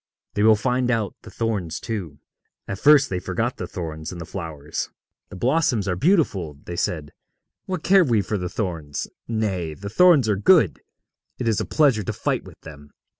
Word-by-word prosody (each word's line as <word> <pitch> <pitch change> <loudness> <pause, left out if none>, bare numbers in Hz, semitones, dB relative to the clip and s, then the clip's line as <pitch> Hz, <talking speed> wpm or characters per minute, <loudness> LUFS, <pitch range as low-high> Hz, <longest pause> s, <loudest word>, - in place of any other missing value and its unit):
They 105 - -1
will 110 +1 +6
find 125 +3 0
out 115 -4 0
the - - -12
thorns 100 -8 -2
too. 90 -11 -5 0.5
At 100 0 -4
first 150 -1 +6
they 90 - -2
forgot - - -2
the - - -5
thorns 80 -2 -6
in 90 - -7
the 85 - -6
flowers. 80 -4 -5 0.4
'The - - -10
blossoms 125 - +1
are 90 - 0
beautiful,' 100 - +1
they 85 - -5
said; 80 -4 -2 0.6
'what 185 -4 -3
care 190 0 +6
we 115 -9 +2
for 105 0 -2
the 90 0 -3
thorns? 80 -9 -3 0.2
Nay, 95 -8 -2
the 100 +5 -7
thorns 165 -3 +5
are 105 - +2
good. 130 - +4 0.6
It 125 - -3
is 110 -3 +2
a - - -2
pleasure 140 -8 +3
to 100 - -3
fight - - -1
with - - -14
them. 75 -2 -12
100 Hz, 185 wpm, -23 LUFS, 85-125 Hz, 0.6 s, will